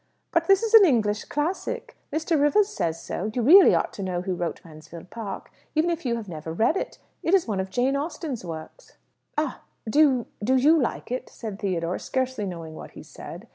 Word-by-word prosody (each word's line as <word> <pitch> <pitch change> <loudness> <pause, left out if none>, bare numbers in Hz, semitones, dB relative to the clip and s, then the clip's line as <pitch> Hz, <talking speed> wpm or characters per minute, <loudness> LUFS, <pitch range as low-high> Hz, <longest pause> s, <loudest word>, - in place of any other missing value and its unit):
"But - - +1
this 390 +2 +5
is 455 0 -2
an 445 -2 +10
English 220 - +2
classic! 375 +10 -3 0.2
Mr. 315 0 0
Rivers 395 +8 +4
says 165 - -2
so. 200 +5 -4
You 245 - 0
really 365 - +8
ought - - -1
to - - -7
know 180 -2 -2
who 185 0 -2
wrote 175 -2 -3
'Mansfield 160 +2 -12
Park,' 225 -3 -7 0.2
even 320 +3 +2
if 330 -5 -3
you 235 - +1
have 225 -3 -6
never 160 -2 -6
read 220 - +2
it. - - -4 0.2
It 345 - +3
is 370 - +2
one 205 -4 -1
of 190 0 -2
Jane 250 +7 +1
Austen's 285 - -4
works." 165 - -9 0.4
"Ah! 300 -4 -1 0.3
Do 250 +7 +1
you 265 -6 +4 0.2
do 255 +5 +3
you 290 +5 +5
like 235 - -3
it?" 255 +1 -3
said 215 -4 -7
Theodore, 180 -3 -2
scarcely 260 -5 -2
knowing 165 -3 -7
what - - -10
he - - -9
said. - - -10
245 Hz, 210 wpm, -25 LUFS, 185-310 Hz, 0.4 s, an